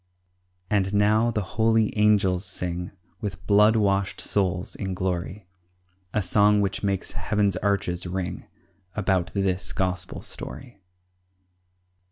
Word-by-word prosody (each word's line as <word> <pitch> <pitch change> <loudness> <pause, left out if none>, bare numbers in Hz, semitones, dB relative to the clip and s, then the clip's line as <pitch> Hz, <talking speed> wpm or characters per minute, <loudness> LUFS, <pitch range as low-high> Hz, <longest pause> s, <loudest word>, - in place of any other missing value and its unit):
And 100 -1 +1
now 110 +3 +4
the 110 -3 -1
holy 110 +2 +1
angels 105 -4 +3
sing, 90 -2 -4 0.3
With 95 -3 -6
blood 105 +2 +5
washed 100 -2 +1
souls 95 -2 -1
in 95 -2 -4
glory, 95 +2 -3 0.7
A 105 0 0
song 105 +3 +4
which 100 -1 -1
makes 100 -2 -1
heaven's 105 -2 0
arches 90 -3 -1
ring 90 0 -4 0.5
About 95 -4 0
this 95 -2 0
Gospel 90 -1 -2
story. 120 -6 -7
100 Hz, 115 wpm, -25 LUFS, 90-105 Hz, 0.7 s, blood